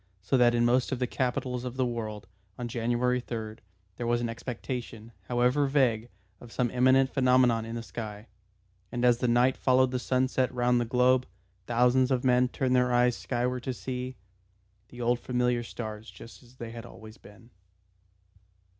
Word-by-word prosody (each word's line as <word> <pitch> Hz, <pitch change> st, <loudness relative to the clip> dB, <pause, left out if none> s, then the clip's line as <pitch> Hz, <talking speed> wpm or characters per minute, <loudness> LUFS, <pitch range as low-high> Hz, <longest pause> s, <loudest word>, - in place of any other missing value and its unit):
So 100 Hz, -, +1 dB
that 120 Hz, -2 st, +4 dB
in 120 Hz, 0 st, +3 dB
most 125 Hz, +3 st, +2 dB
of 130 Hz, -, -1 dB
the 125 Hz, -, 0 dB
capitals 125 Hz, 0 st, -2 dB
of 125 Hz, 0 st, -6 dB
the 130 Hz, -, +2 dB
world, 110 Hz, -4 st, -4 dB, 0.3 s
on 120 Hz, -, -4 dB
January 120 Hz, +1 st, 0 dB
3rd, 110 Hz, -3 st, -6 dB, 0.4 s
there 120 Hz, -, -3 dB
was 120 Hz, 0 st, +2 dB
an 120 Hz, -1 st, -2 dB
expectation, 115 Hz, -1 st, -6 dB, 0.2 s
however 125 Hz, +4 st, +2 dB
vague 125 Hz, -5 st, +1 dB, 0.3 s
of 120 Hz, -, -13 dB
some 120 Hz, -1 st, -1 dB
imminent 130 Hz, +1 st, +3 dB
phenomenon 125 Hz, -3 st, +3 dB
in 115 Hz, +1 st, -6 dB
the 115 Hz, -, -5 dB
sky; 110 Hz, -2 st, -7 dB, 0.7 s
and 120 Hz, 0 st, -1 dB
as 120 Hz, -1 st, +4 dB
the 125 Hz, -, 0 dB
night 120 Hz, +2 st, +3 dB
followed 130 Hz, 0 st, +3 dB
the 125 Hz, -, -1 dB
sunset 130 Hz, 0 st, 0 dB
round 125 Hz, -1 st, +2 dB
the -, -, -1 dB
globe, 125 Hz, +2 st, +3 dB, 0.4 s
thousands 125 Hz, +2 st, +3 dB
of 130 Hz, -2 st, 0 dB
men 125 Hz, -1 st, +4 dB
turned 130 Hz, 0 st, 0 dB
their 125 Hz, 0 st, +3 dB
eyes 125 Hz, 0 st, +3 dB
skyward 125 Hz, 0 st, -2 dB
to 130 Hz, +1 st, -4 dB
see 130 Hz, 0 st, -5 dB, 0.7 s
the 125 Hz, -, -10 dB
old 120 Hz, 0 st, +1 dB
familiar 125 Hz, -1 st, 0 dB
stars 110 Hz, -2 st, -7 dB
just 115 Hz, -, -13 dB
as 125 Hz, 0 st, -20 dB
they 115 Hz, -2 st, -7 dB
had 115 Hz, 0 st, -8 dB
always 110 Hz, -1 st, -13 dB
been. 110 Hz, +4 st, -17 dB
125 Hz, 175 wpm, -28 LUFS, 120-125 Hz, 0.7 s, that